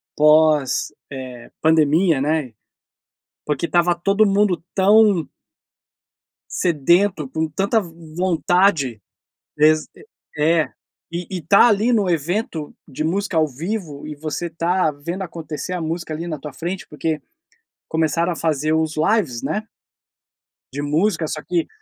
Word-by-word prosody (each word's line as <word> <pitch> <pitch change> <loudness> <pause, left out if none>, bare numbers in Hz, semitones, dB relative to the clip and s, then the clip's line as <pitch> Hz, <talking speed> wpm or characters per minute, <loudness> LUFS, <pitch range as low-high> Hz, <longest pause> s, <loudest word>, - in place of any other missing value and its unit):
pós, 150 -3 +3 0.2
eh, 130 -3 -8
pandemia, 160 0 +3
né, 150 -4 -1 0.9
porque 150 +3 -1
estava 175 0 +2
todo 195 +5 +2
mundo 200 -2 +2
tão 200 -3 +4 1.3
sedento, 170 0 +2
com 160 +3 -2
tanta 200 +7 +1
v 175 - -9 0.3
vontade. 175 - +2 0.6
Exa 155 +1 +4 0.5
e - - -3
é. 160 0 +3 0.4
E 175 +1 -4
e 185 - -3
estar 185 +8 +5
ali 220 +2 +2
no 205 -6 +2
evento 170 - -2
de 145 - -4
música 185 +3 -1
ao 160 -1 +4
vivo 155 - -5
e 150 - -6
você 155 +3 -4
estar 170 0 0
vendo 170 +7 -5
acontecer 170 0 -6
a 180 - -3
música, 160 0 -3
ali 165 +3 -5
na 155 -3 -4
tua 150 0 -8
frente, 175 +3 -5
porque 155 0 -3 0.7
começaram 160 +2 +1
a - - -5
fazer 155 -1 0
os 160 -1 0
lives, 160 - +1
né 215 +1 -2 1.1
de 145 - -3
música, 160 +3 +1
só 155 - -4
que 175 -2 -1
165 Hz, 135 wpm, -21 LUFS, 150-185 Hz, 1.3 s, estar